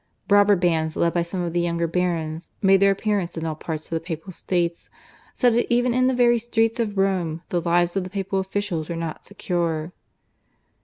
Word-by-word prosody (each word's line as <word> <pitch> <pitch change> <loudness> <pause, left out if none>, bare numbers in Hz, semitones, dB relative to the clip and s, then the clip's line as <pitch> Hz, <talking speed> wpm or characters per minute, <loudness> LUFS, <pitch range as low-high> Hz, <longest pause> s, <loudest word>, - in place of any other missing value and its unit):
Robber 205 0 +6
bands 165 -3 0
led 170 0 +2
by 175 - +1
some 175 +2 -3
of 170 -1 -3
the 175 - +1
younger 170 0 0
barons 165 -1 -2
made 195 -1 +5
their 200 0 +5
appearance 195 -3 -1
in 160 - -3
all 160 - -1
parts 155 0 -5
of - - -13
the 165 - 0
Papal 165 +2 -6
States, 170 -1 -2 0.5
so 245 -2 +4
that 235 +1 0
even 245 0 +3
in 255 +1 +3
the 260 - +1
very 240 -1 +4
streets 225 0 0
of 210 -3 -1
Rome 180 -4 0
the 175 - 0
lives 175 +1 +1
of 195 - 0
the 185 - -7
papal 195 0 -2
officials 190 -4 -3
were 170 - -3
not 165 -1 -5
secure. 170 -2 -2
180 Hz, 205 wpm, -23 LUFS, 170-205 Hz, 0.5 s, Robber